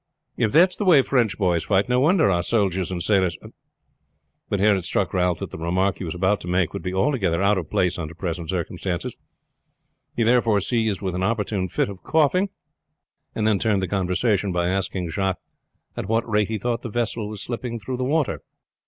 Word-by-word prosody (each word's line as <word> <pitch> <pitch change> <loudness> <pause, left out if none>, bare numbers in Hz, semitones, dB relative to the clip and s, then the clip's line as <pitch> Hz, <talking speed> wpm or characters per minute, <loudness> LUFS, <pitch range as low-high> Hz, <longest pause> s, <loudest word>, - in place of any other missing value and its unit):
If 110 -3 +1
that's 180 +4 +5
the - - -3
way 165 -8 +6
French 120 -7 +1
boys 90 -5 +1
fight, 100 +1 +2
no 125 0 +2
wonder 160 +5 +4
our 85 -1 +2
soldiers 95 -2 0
and 90 -2 -3
sailors 95 -5 +2 0.6
" - - -49
But 100 - 0
here 105 +1 +4
it 95 - -3
struck 95 +2 -1
Ralph 90 -2 +1
that - - -6
the - - -8
remark 90 +4 0
he - - -5
was 85 -1 -4
about 95 +3 +1
to - - -8
make 90 -2 +1
would - - -4
be 90 - -3
altogether 95 - +1
out 100 0 +3
of 80 - -7
place 90 0 0
under 80 0 -6
present 85 -2 -4
circumstances. 90 0 -3 1.0
He 120 - +1
was 115 - +3
therefore 115 -4 +3
seized 110 -1 -1
with 95 -2 -2
an 90 - -2
opportune 105 -2 -1
fit 90 - 0
of 100 -2 -9
coughing, 160 +5 +2 0.9
and 110 - -1
then 105 -3 +2
turned 105 -4 +1
the - - -1
conversation 95 +2 0
by 85 0 0
asking 95 -2 -2
Jacques 95 +2 -1 0.6
at - - -4
what 115 +1 +1
rate 105 -2 +1
he 110 - -2
thought 120 +3 -2
the 120 - -6
vessel 115 -1 -2
was 105 -2 -4
slipping 120 -1 -4
through 125 +4 -5
the 130 - -2
water. 145 +2 0
100 Hz, 210 wpm, -23 LUFS, 90-115 Hz, 1.0 s, way